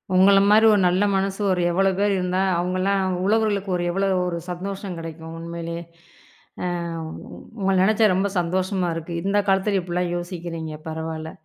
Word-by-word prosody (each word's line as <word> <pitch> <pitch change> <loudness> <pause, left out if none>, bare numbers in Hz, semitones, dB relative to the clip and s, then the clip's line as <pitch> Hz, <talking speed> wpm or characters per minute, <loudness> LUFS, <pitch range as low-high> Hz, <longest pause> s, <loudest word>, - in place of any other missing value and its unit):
உங்கள 195 +2 +6
மாரி 215 +2 +6
ஒரு 200 - +3
நல்ல 185 +3 +2
மனசு 195 +1 -1
ஒரு 180 -1 +1
எவ்வளவு 190 +1 +2
பேர் 205 0 +2
இருந்தா, 180 0 -1 0.2
அவங்கல்லா 185 +2 0 0.3
உழவர்களுக்கு 205 -2 +1
ஒரு 175 - -2
எவ்வளவு 195 +1 +1
ஒரு 170 -1 -2
சந்தோஷம் 190 +1 -5
கெடைக்கும் 165 0 -8
உண்மையிலயே. 170 0 -5 0.8
அ - - -1 0.4
உங் 160 - -8 0.4
உங்கள 195 -1 +1
நினைச்சா 215 +3 +4
ரொம்ப 195 +2 +1
சந்தோஷமா 185 +1 -1
இருக்கு. 165 +1 -6
இந்தக் 200 +1 +1
காலத்துல 195 +1 +2
இப்டி 175 -1 -6
எல்லாம் 180 0 0
யோசிக்கிறீங்க. 170 -2 -5
பரவாயில்ல. 160 0 -5
185 Hz, 155 wpm, -23 LUFS, 170-195 Hz, 0.8 s, உங்கள